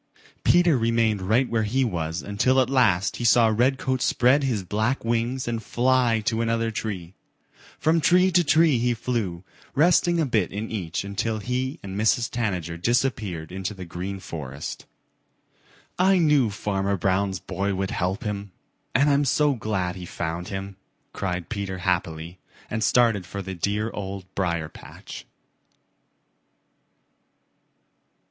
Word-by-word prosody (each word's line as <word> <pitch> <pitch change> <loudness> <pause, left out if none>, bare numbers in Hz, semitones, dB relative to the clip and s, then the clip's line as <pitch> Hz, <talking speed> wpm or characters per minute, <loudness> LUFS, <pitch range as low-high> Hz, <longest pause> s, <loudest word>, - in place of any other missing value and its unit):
Peter 175 -6 +4
remained 115 -3 +1
right 110 +8 +2
where 115 -1 0
he 125 +5 +1
was 85 -4 -3
until 120 +6 +2
at 130 0 +2
last 100 -8 +2
he - - -4
saw 120 0 +5
Redcoat 130 +1 +1
spread 130 +4 +3
his 115 -8 0
black 110 +7 -1
wings 120 +3 -1
and 115 -1 -2
fly 120 0 +2
to 110 +2 0
another 115 0 0
tree. 95 -6 -5 0.6
From 160 +1 +2
tree 180 +3 +4
to 175 0 +4
tree 155 -3 +4
he 120 0 +1
flew, 110 -8 -3 0.3
resting 170 +3 +4
a 160 - +2
bit 110 -8 0
in 105 +3 -5
each 90 -6 -3
until 100 +3 -2
he 125 +7 -3
and 95 -1 -6
Mrs. 110 +3 +1
Tanager 90 -8 -2
disappeared 105 -6 -1
in 95 +1 -6
the 95 -1 -5
Green 90 +3 -5
Forest. 75 -6 -7 1.1
"I 190 +1 +5
knew 150 -8 +4
Farmer 100 -1 -1
Brown's 95 +1 0
boy 100 +4 -2
would 95 0 -2
help 95 +3 -2
him, 100 -2 -4 0.5
and 140 +3 +4
I'm 145 0 +3
so 145 +1 +2
glad 100 -6 -2
he 90 -2 -8
found 85 +1 -4
him," 95 0 -6 0.4
cried 90 -3 -3
Peter 100 -4 -4
happily 85 -2 -2 0.3
and 110 0 -1
started 115 -5 +3
for 100 +1 -5
the 95 0 -5
dear 105 +5 -1
Old 100 -1 -6
Briar 85 -4 -1
patch. - - -11
110 Hz, 145 wpm, -25 LUFS, 95-125 Hz, 1.1 s, saw